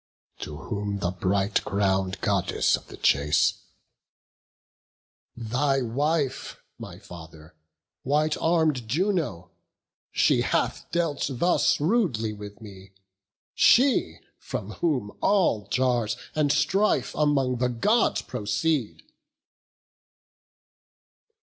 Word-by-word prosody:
To 75 - -7
whom 100 +2 -4
the 90 -3 -2
bright 95 +2 0
crown'd 95 -1 -1
Goddess 100 -3 +1
of - - -10
the - - -11
chase: 75 +1 +2 1.8
"Thy 130 +4 0
wife, 140 +3 -1 0.2
my 85 - -9
father, 80 -4 -13 0.5
white 150 +3 +1
arm'd 160 -8 +1
Juno; 150 - -1 0.6
she - - +3
Hath - - -1
dealt 165 -5 -1
thus 155 +7 +2
rudely 150 - 0
with 105 0 -10
me; 95 -2 -13 0.6
she, 245 - +4 0.2
from 105 +1 -6
whom 130 -8 -2
All 170 - +2
jars 125 -3 0 0.2
and 150 -2 +1
strife 200 +7 +1
among 140 -4 +1
the 125 +1 0
Gods 210 - +1
proceed." 125 +3 -2
120 Hz, 95 wpm, -25 LUFS, 100-150 Hz, 1.8 s, she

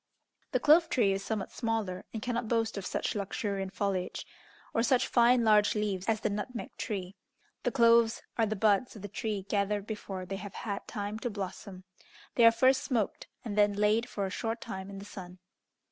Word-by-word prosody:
The - - +2
clove 320 +2 +5
tree 215 -6 +3
is 195 0 -3
somewhat 210 -1 -3
smaller, 220 -6 -2
and 220 -2 -5
cannot 240 -1 -2
boast 225 -1 0
of 200 -2 -4
such - - -1
luxuriant 200 -1 -3
foliage, 195 -3 -2 0.5
or 230 - +2
such 245 +2 +3
fine 240 0 +4
large 210 -1 +4
leaves 200 -3 -1
as 220 -1 +1
the - - 0
nutmeg 210 +4 -5
tree. 195 -4 -4 0.5
The 245 - 0
cloves 230 -2 +4
are 225 -2 +2
the 215 - -1
buds 215 +4 +2
of 205 - -10
the - - -4
tree 205 0 -3
gathered 200 0 0
before 195 -4 -5
they 195 +2 -4
have 195 0 -8
had 200 -3 -4
time 205 +1 -4
to 245 - -2
blossom. 195 -2 -6 0.5
They 235 - +5
are - - +8
first 260 +3 +4
smoked, 230 -7 -1 0.2
and 210 -3 -3
then 205 -1 +4
laid 210 +4 +2
for 200 -4 -2
a 190 - -4
short 225 +3 -2
time 190 -2 -6
in 200 - -8
the 200 - -8
sun. 185 -3 -9
210 Hz, 195 wpm, -30 LUFS, 195-230 Hz, 0.5 s, are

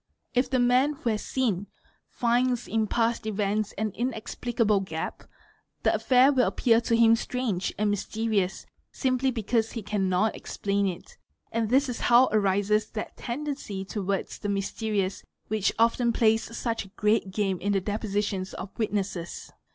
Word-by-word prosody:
If 250 +1 +2
the 260 - +1
man 250 +4 +3
who 245 -5 -2
has 215 - -2
seen, 210 -7 -1 0.4
finds 245 0 +1
in 220 -1 0
past 230 0 0
events 210 0 0
an 215 +1 -2
inexplicable 230 -1 0
gap, 160 -4 -5 0.6
the - - +3
affair 260 +2 +4
will 255 -3 +3
appear 230 -1 +3
to 230 - +1
him 230 0 +6
strange 230 -6 -2
and 210 0 +1
mysterious 205 -2 -1 0.3
simply 260 0 +1
because 225 -1 0
_ - - -12
he 230 - -5
cannot 195 0 +1
explain 200 0 -1
it; 190 - -7 0.3
and 225 -2 0
this 270 +3 +3
is 245 -2 -4
how 245 +2 +5
arises 210 +1 +2
that 215 - -6
tendency 245 -7 -4
towards 195 -1 -3
the 205 - -3
mysterious 200 0 -1 0.3
which 215 -2 +1
often 235 +1 +3
plays 225 0 +1
such 230 -2 -2
a - - -14
great 210 0 +1
game 190 -2 -1
in 205 - -1
the 195 - +3
depositions 205 -1 -2
of 185 - -6
ih - - -35
witnesses. 195 -5 -3
220 Hz, 160 wpm, -27 LUFS, 200-240 Hz, 0.6 s, him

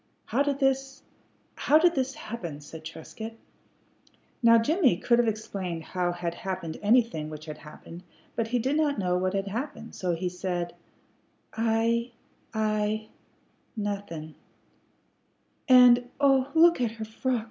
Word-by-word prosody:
"How 265 - 0
did 285 -1 +1
this 270 0 0 0.5
how 300 - +4
did 345 +2 +4
this 265 -2 -1
happen?" 175 -10 -6
said 155 +2 -11
Trescott. 220 +8 -8 1.1
Now 230 -1 +7
Jimmie 265 - +3
could 240 +5 +2
have 240 - +3
explained 195 -6 -3
how 180 +1 -1
had 175 -1 -3
happened 185 -3 -5
anything 215 -8 +2
which 155 0 -8
had 155 -1 -8
happened, 165 +3 -11 0.3
but 230 -1 -1
he 245 +2 0
did 260 +5 0
not 300 -3 +1
know 180 -3 0
what 185 +1 -1
had 195 0 -1
happened, 235 +2 -5
so 180 -2 -1
he 180 +2 -2
said, 180 -1 -3 0.8
"I 230 +2 +1 0.4
I 215 0 -1 0.7
nothin'." 200 -7 -4 1.4
"And, 245 -1 +7
oh, 270 -2 +4
look 335 -3 +6
at 230 -2 0
her 220 -1 -6
frock!" 245 +3 -1
220 Hz, 140 wpm, -27 LUFS, 180-250 Hz, 1.4 s, Now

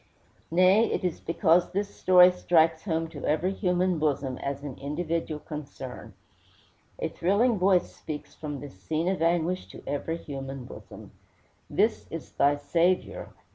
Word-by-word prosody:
Nay, 185 +6 +5
it - - -1
is 180 -3 -1
because 170 0 +2
this 200 +1 -2
story 180 0 +7
strikes 165 -2 +2
home 165 -3 -1
to 150 -4 -9
every 170 +5 +1
human 180 -3 +1
bosom 140 -4 -1
as 140 0 -4
an 140 -4 -7
individual 155 +2 -3
concern. 145 -4 -8 0.8
A - - -1
thrilling 205 +5 +1
voice 185 -1 +2
speaks 150 -1 -7
from 145 -3 -6
this 145 -1 -9
scene 160 - -1
of 190 -2 0
anguish 170 +2 +1
to - - -12
every 165 +3 -2
human 135 -4 -7
bosom: - - -11 0.6
This - - +1
is - - -7
thy 140 +1 +3
Saviour. 170 +5 0
165 Hz, 145 wpm, -27 LUFS, 145-180 Hz, 0.8 s, story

